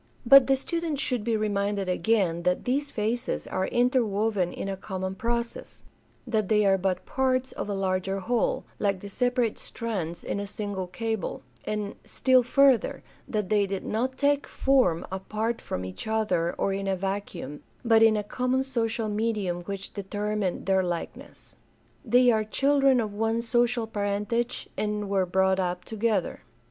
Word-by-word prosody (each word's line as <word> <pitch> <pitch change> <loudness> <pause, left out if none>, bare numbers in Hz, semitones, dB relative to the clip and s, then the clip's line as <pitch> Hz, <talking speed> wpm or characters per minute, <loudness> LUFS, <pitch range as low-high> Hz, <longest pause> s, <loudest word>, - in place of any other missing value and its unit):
But 270 +1 +8
the 270 - +4
student 325 +1 -3
should 250 -5 0
be 225 0 +1
reminded 200 -2 -1
again 185 -3 +1
that 180 +1 0
these 280 +3 0
phases 235 +1 -2
are 190 0 -1
interwoven 220 -6 +1
in - - -5
a 195 - -2
common 190 -1 -4
process; 235 - -4 0.4
that 220 -5 0
they 210 -1 +4
are 195 -1 +4
but 185 -1 -1
parts 260 -1 0
of - - -5
a 200 - -1
larger 195 0 -1
whole, 235 +4 0 0.2
like 200 -2 +1
the 200 - -7
separate 245 +1 0
strands 185 -8 -4
in - - -3
a 200 - -4
single 200 -2 -4
cable; 220 - -3 0.2
and, 210 -1 -3
still 260 -1 +3
further, 265 0 +3 0.2
that 210 -4 -2
they 205 -2 +3
did 195 -1 -4
not 255 +4 -1
take 285 0 +2
form 255 -12 +2
apart 215 +4 -2
from 90 - -4
each 95 - -7
other 215 -6 +1
or 195 - 0
in 195 0 -3
a 195 - +1
vacuum, 190 -6 -4 0.2
but 225 -1 +5
in 225 -1 +6
a 210 - -1
common 255 +4 0
social 230 -4 -1
medium 210 -4 -1
which 195 0 -6
determined 205 -1 -2
their 190 -1 +3
likeness. 175 -2 -6 0.5
They 245 +1 +5
are 220 -1 +2
children 275 +3 +3
of 215 -3 -2
one 225 +2 0
social 240 0 +1
parentage 210 +3 -2
and 210 -1 -2
were 190 -2 +2
brought 190 +1 +2
up 180 -1 -2
together. 220 -4 -1
215 Hz, 160 wpm, -27 LUFS, 195-240 Hz, 0.5 s, But